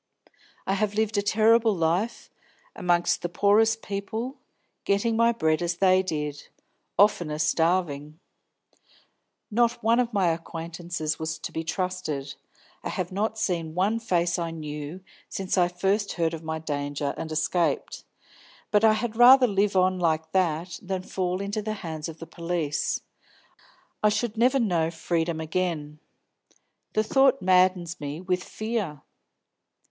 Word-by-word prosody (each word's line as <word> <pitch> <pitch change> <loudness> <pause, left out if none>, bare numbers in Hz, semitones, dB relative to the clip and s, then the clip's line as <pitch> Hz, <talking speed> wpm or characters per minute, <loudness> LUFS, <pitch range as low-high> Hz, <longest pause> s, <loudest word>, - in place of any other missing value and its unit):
I 190 - 0
have 205 +1 0
lived 220 0 0
a - - +2
terrible 220 +1 +4
life, 175 +7 -1 0.4
among 175 -1 +1 0.2
the 175 - -2
poorest 215 +5 +3
people, 220 +6 -4 0.5
getting 200 +3 +1
my 230 +1 +4
bread 160 -8 +1
as 175 0 -1
they 185 -1 +4
did; 150 -5 -4 0.5
oftener 175 -7 +3
starving. 155 -1 0 1.3
Not 235 +1 +1
one 230 +2 +4
of 245 -1 +1
my 195 -5 +2
acquaintances 165 -1 -4
was 160 0 -3
to - - -7
be 160 - -3
trusted. 165 -5 -3 0.5
I - - -3
have 180 -1 -3
not 215 +3 -1
seen 165 -6 -2
one 205 +5 +1
face 175 -5 0
I 170 -1 -2
knew 150 +1 -6 0.3
since 190 -1 -2
I 180 -2 +4
first 195 +4 0
heard 165 -2 0
of 165 - -5
my 160 0 -3
danger 145 -2 -3
and 160 - -6
escaped. 165 +2 0 0.7
But 210 0 +3
I 220 -1 +6
had 225 0 -2
rather 250 +2 +8
live 200 -2 +1
on 185 0 +3
like 160 -2 0
that 170 -1 0
than 185 -1 -3
fall 185 0 -2
into 205 +2 -2
the 215 +1 -3
hands 160 -1 -4
of 160 - -9
the 165 - -8
police; 165 -2 -2 1.0
I 210 - +5
should 215 +1 -1
never 250 +4 +3
know 175 -8 +1
freedom 165 0 -2
again. 160 -2 -2 0.9
The 215 - +2
thought 270 +4 +4
maddens 185 -2 +2
me 145 +1 -5
with 180 0 -1
fear." 215 - -4
180 Hz, 145 wpm, -26 LUFS, 160-210 Hz, 1.3 s, rather